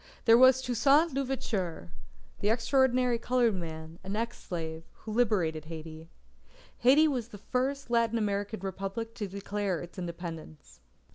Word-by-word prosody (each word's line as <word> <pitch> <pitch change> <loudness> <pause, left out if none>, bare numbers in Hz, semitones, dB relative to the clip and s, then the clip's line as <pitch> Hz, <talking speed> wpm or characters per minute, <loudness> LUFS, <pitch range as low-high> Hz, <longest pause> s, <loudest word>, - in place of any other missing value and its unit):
There 230 - +8
was 260 +1 +6
Toussaint 275 +6 +3
l'Ouverture, 215 - -3 0.5
the 205 - +1
extraordinary 250 +1 +2
coloured 240 -2 +2
man, 160 -2 -7
an 195 +2 -4
ex 230 +2 -3
slave, 160 -2 -5
who 220 - -9
liberated 185 -10 +1
Haiti. 160 0 -9 0.7
Haiti 285 +6 +6
was 250 -6 -2
the 215 - -11
first 260 +5 -2
Latin 230 -1 +2
American 205 -1 -2
Republic 195 +4 -4
to 210 -3 -4
declare 200 -1 -3
its 175 +2 -9
Independence. 170 -3 -8
210 Hz, 135 wpm, -29 LUFS, 175-245 Hz, 0.7 s, There